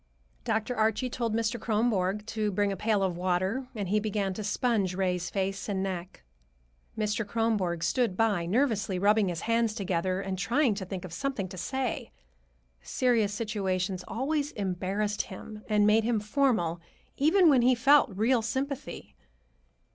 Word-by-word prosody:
Dr. 225 +3 -1
Archie 220 +3 +1
told 230 -3 -1
Mr. 230 +1 0
Kronborg 210 -3 0
to 220 -1 -1
bring 205 +1 +1
a - - -2
pail 210 +1 +1
of 185 -2 0
water, 185 +8 -1
and 200 -4 -3
he 210 +2 +3
began 205 -2 -1
to 215 - -5
sponge 205 -3 0
Ray's 180 -2 -1
face 195 +1 -2
and 190 -1 -1
neck. 185 -2 -5 0.7
Mr. 215 +1 0
Kronborg 205 -6 -1
stood 190 +3 +1
by, 205 -7 +1
nervously 215 -3 +1
rubbing 205 +2 +3
his 175 -2 -3
hands 230 -1 +1
together 185 -3 -1
and 190 -1 -4
trying 235 +5 +2
to 195 -1 -5
think 185 -1 -6
of 175 - -9
something 260 -1 -2
to 185 - -9
say. 260 +7 -3 0.7
Serious 230 - +1
situations 195 -4 -2
always 290 +4 -1
embarrassed 200 +2 -1
him 210 +3 -9
and 210 -1 +4
made 215 +1 +4
him 230 -1 +1
formal, 210 - +1 0.4
even 335 +6 +5
when 275 -5 +6
he 250 +1 +4
felt 280 +4 +5
real 225 +5 +2
sympathy. 270 +4 -4
210 Hz, 155 wpm, -28 LUFS, 190-230 Hz, 0.7 s, when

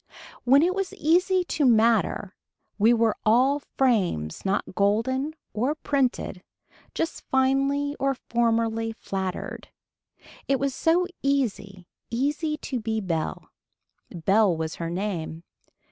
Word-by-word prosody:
When 275 +4 +6
it 360 +2 +2
was 390 -1 -3
easy 360 +4 +2
to 315 -3 -2
matter 225 -5 +3 0.4
we 220 +3 +5
were 230 -2 +3
all 255 +6 +4 0.2
frames 185 - +1
not 195 0 -1
golden 245 +10 0 0.2
or 250 +8 0
printed, 265 -10 -1 0.5
just 330 - -2
finely 275 +2 +1
or 275 0 +1
formerly 230 -2 0
flattered. 190 -4 -5 0.8
It 275 -1 +2
was 275 -1 0
so 335 +6 +2 0.2
easy 205 -9 -1 0.2
easy 295 +5 -1
to 260 -4 -4
be 220 0 -2
bell. 170 -6 -3 0.6
Belle 190 +1 +2
was 160 0 -4
her 165 - -2
name. 170 -3 -4
235 Hz, 115 wpm, -25 LUFS, 200-280 Hz, 0.8 s, When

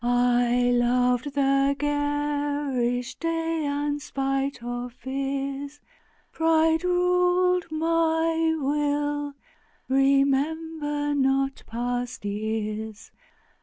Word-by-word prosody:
I 245 0 +3
loved 250 +3 +1
the 275 0 +3
garish 290 -4 -1
day, 330 -1 -1
and, 290 +1 -1
spite 275 -2 -2
of 245 0 -5
fears, 275 +2 -4 0.5
Pride 320 0 +2
ruled 360 0 +2
my 325 0 +1
will, 290 0 -1 0.5
remember 290 +2 +1
not 270 -1 +1
past 245 0 -3
years. 215 +1 -4
280 Hz, 75 wpm, -25 LUFS, 250-315 Hz, 0.5 s, I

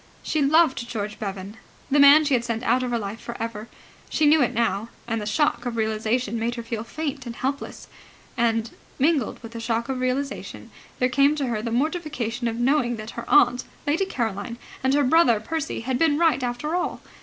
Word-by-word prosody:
She 310 - 0
loved 275 -4 +3
George 210 -3 -4
Bevan, 195 +1 -6 0.3
the 290 - +4
man 285 +2 +8
she 285 - +1
had 240 -2 +2
sent 230 0 -3
out 250 +1 +2
of 250 - -2
her 240 - 0
life 210 0 -5
for 235 - -7
ever. 225 -1 -5 0.4
She 310 - +1
knew 300 +1 +5
it 245 - +2
now, 225 -1 0 0.2
and 225 -2 -1
the 210 - -5
shock 245 0 +1
of 240 - -3
realization 220 +1 -1
made 235 +2 -1
her 235 - -5
feel 230 -1 -4
faint 280 0 -5
and 235 - -6
helpless. 275 +3 -4 0.5
And, 230 -2 +1 0.3
mingled 285 -4 +1
with 230 - -8
the 230 - -7
shock 230 +1 -2
of 265 -1 -2
realization, 260 +2 -3 0.3
there 250 - +2
came 280 +4 +3
to 285 -3 -1
her 230 -4 -2
the 230 - -3
mortification 265 -3 -2
of 225 - -2
knowing 240 0 +1
that 215 0 -7
her 235 - -8
aunt, 250 -4 +4 0.2
Lady 310 +7 +1
Caroline, 230 - -3 0.3
and 265 +1 +3
her 290 - +3
brother, 255 -5 +4
Percy, 310 +6 -3
had 250 +2 -2
been 315 -3 +3
right 320 -5 +3
after 250 +6 -3
all. 360 - -2
245 Hz, 205 wpm, -24 LUFS, 230-285 Hz, 0.5 s, man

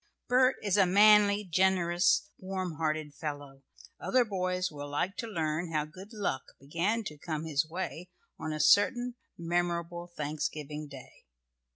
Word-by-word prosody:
Bert 255 +1 +4
is 205 -1 +1
a 195 -2 +5
manly, 205 +1 +6
generous, 175 -1 +2
warm 185 -4 -4
hearted 155 -2 -2
fellow. 145 -3 -6 0.4
Other 255 -2 +2
boys 185 -3 -1
will 145 -1 -7
like 175 +7 -1
to 230 - -3
read 165 -3 -2
how 155 -2 0
good 185 +7 -12
luck 200 - -2 0.2
began 170 +11 -1
to 150 -7 -7
come 155 0 -4
his 155 0 0
way 180 0 -5 0.3
on 160 - -4
a 155 - -3
certain 240 +8 +4 0.2
memorable 175 0 -2
Thanksgiving 150 0 -4
Day. 135 - -13
175 Hz, 145 wpm, -30 LUFS, 155-195 Hz, 0.4 s, manly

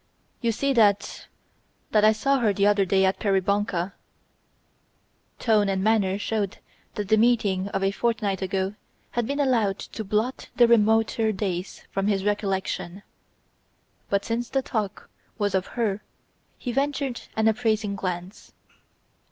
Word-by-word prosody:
"You 235 -2 +2
see 275 +5 0
that... 205 -4 +2 0.6
that 210 -1 +4
I 215 - +7
saw 275 +5 +1
her 220 -4 +2
the 200 +1 +1
other 205 -1 +4
day 190 +1 +3
at 190 - +1
Peribonka." 195 -2 0 1.4
Tone 210 -3 +2
and 190 -1 0
manner 200 -3 +2
showed 205 -2 -2 0.4
that 205 -2 -4
the 220 - +5
meeting 210 -5 +2
of 195 -1 -2
a 195 - +2
fortnight 210 -3 -1
ago 190 +1 -1 0.4
had 240 -2 -1
been 280 +1 -2
allowed 230 -8 +2
to 220 - -7
blot 215 +5 -2
the 240 - +6
remoter 225 0 +3
days 190 -2 -4
from 195 0 -1
his 195 -2 0
recollection. 195 -2 -2 1.1
But 200 0 0
since 235 +1 -2
the 270 -1 0
talk 210 -5 -3 0.3
was 205 -3 0
of 190 -1 0
her 210 -4 0 0.6
he 245 - -4
ventured 275 -1 -1
an 220 0 +2
appraising 220 -2 +1
glance. 185 +1 -5
210 Hz, 145 wpm, -25 LUFS, 195-225 Hz, 1.4 s, I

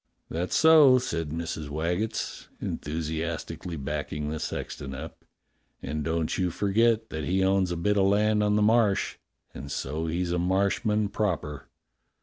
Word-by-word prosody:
"That's 85 +3 -2
so," 155 -5 +7
said 85 -11 -2
Mrs. 80 -1 -4
Waggetts, 90 +9 -2
enthusiastically 80 +2 -4
backing 75 +1 -3
the 80 - -3
sexton 65 -2 -5
up. - - -9 0.6
"And 75 +2 -3
don't 80 +2 -1
you 90 -1 +1
forget 110 +5 +1
that 80 -1 -3
he 95 +2 +1
owns 95 -1 +2
a 85 - -2
bit 105 +5 +1
of 95 - +4
land 105 +1 +3
on 105 0 +2
the 105 - +3
Marsh, 110 -2 +2 0.4
and 70 0 -8
so 75 +5 -3
he's 85 +2 -1
a 90 - 0
Marsh 95 +5 +1
man 105 -2 +1
proper." 75 -10 -2
90 Hz, 150 wpm, -27 LUFS, 80-105 Hz, 0.6 s, so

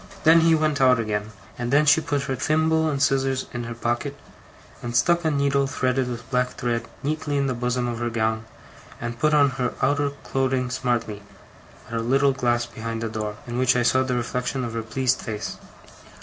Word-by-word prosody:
Then 160 +1 +7
he 165 0 +5
went 155 -2 +1
out 130 -2 +5
again; 105 -1 -2 0.3
and 120 0 -2
then 145 +2 +4
she 150 +2 +5
put 145 -3 -1
her 135 - -2
thimble 160 +3 +2
and 140 -2 -1
scissors 135 -1 +1
in 120 -1 -4
her 120 0 -6
pocket, 120 +5 -2 0.6
and 120 0 -5
stuck 170 +8 +3
a 160 - +2
needle 140 -1 +1
threaded 130 -1 0
with 120 0 -6
black 125 0 0
thread 115 -1 -2 0.2
neatly 150 0 -1
in 140 - +1
the 130 - 0
bosom 125 0 -1
of 120 -1 -3
her 120 0 -1
gown, 110 -1 -1 0.5
and 120 0 -5
put 155 +2 +3
on 140 -2 +5
her 125 - -1
outer 145 0 +2
clothing 130 -1 0
smartly, 120 -5 -1 0.7
at - - -11
a 115 - 0
little 135 +4 +3
glass 120 -2 +1
behind 115 -1 -5
the 115 - -2
door, 105 -1 -4
in 120 0 -4
which 130 -1 +3
I 125 - +2
saw 130 +2 +3
the 130 -1 -1
reflection 125 +2 -2
of 115 -2 -4
her 115 - -2
pleased 130 +3 0
face. 105 -2 -5
125 Hz, 205 wpm, -24 LUFS, 120-140 Hz, 0.7 s, Then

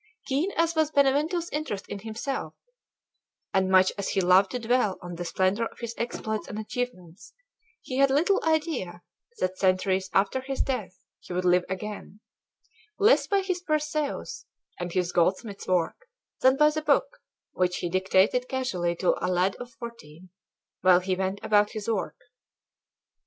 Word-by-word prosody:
Keen 285 +8 0
as 330 0 +1
was 315 -2 +2
Benvenuto's 300 +4 +2
interest 290 -10 -3
in 200 - -6
himself, 225 +6 -4 1.0
and 190 -1 +2
much 185 0 +5
as 200 - -2
he - - 0
loved 185 +1 +5
to 250 - -3
dwell 235 -4 +1
on 175 0 -8
the 175 +1 -5
splendor 190 +6 +1
of - - -18
his 235 -1 -5
exploits 220 -2 -3
and 210 - -6
achievements, 215 -6 -6 0.5
he 255 - -4
had 275 0 +5
little 325 +9 +2
idea 300 - -1 0.3
that 185 - -2
centuries 190 0 +1
after 200 +7 +1
his 270 +1 -2
death 245 -9 -4
he - - -9
would 180 +1 -1
live 180 0 +4
again, 205 +1 -6 0.8
less 425 +3 +4
by 400 -1 +2
his 370 -2 -2
"Perseus" 305 -3 -2 0.3
and 175 0 -4
his 180 0 0
goldsmith's 195 +4 0
work 185 - 0 0.3
than 260 +1 +4
by 300 +1 +5
the 310 0 -2
book - - +1 0.3
which 180 -1 0
he - - -2
dictated 190 +7 +2
casually 185 -10 -1
to 180 - +2
a - - +1
lad 180 +2 +1
of 245 - -8
fourteen, 230 -8 -11 0.5
while 185 -1 +6
he 185 0 -1
went 190 +1 -2
about 210 -1 +3
his 215 -2 -5
work. 225 -3 -2
210 Hz, 160 wpm, -27 LUFS, 185-275 Hz, 1.0 s, while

